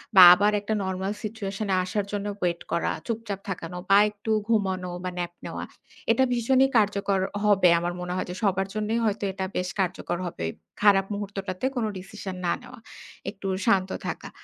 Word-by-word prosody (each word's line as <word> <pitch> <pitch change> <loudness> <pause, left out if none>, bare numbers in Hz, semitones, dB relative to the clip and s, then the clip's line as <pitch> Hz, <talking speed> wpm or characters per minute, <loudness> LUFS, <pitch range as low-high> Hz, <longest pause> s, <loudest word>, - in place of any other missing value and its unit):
বা 190 - +10
আবার 205 +3 +3
একটা 210 +2 -3
নরমাল 190 +1 -2
সিচুয়েশন 210 -1 -4
এ - - +4
আসার 200 +2 -2
জন্য 205 -1 -2
ওয়েট 170 -1 -1
করা, 170 - +1 0.2
চুপচাপ 225 -4 -3
থাকানো 180 -1 -5
বা 195 - +7
একটু 210 +1 -5 0.2
ঘুমানো 190 -5 +1
বা 185 - -1
ন্যাপ 175 -1 -3
নেওয়া। - - -5 0.5
এটা 265 - +4
ভীষণই 260 +3 +4
কার্যকর 200 -2 +2 0.2
হবে। 195 -3 +5
আমার 175 +1 -2
মনে 180 0 -3
হয় - - -1
যে - - -5
সবার 195 -1 +2
জন্যই 215 +2 0
হয়তো 210 0 0
এটা 190 0 -3
বেশ 180 0 -1
কার্যকর 180 -2 -1
হবে। 85 - -5 0.4
খারাপ 195 -2 +5
মুহূর্তটাতে 200 +1 -4
কোন 240 -3 0
ডিসিশন 190 0 -7
না 170 - +2
নেওয়া। 250 0 -12 0.5
একটু 195 -1 -7 0.2
শান্ত 190 -4 +3 0.2
থাকা। - - -5
195 Hz, 175 wpm, -26 LUFS, 185-210 Hz, 0.5 s, বা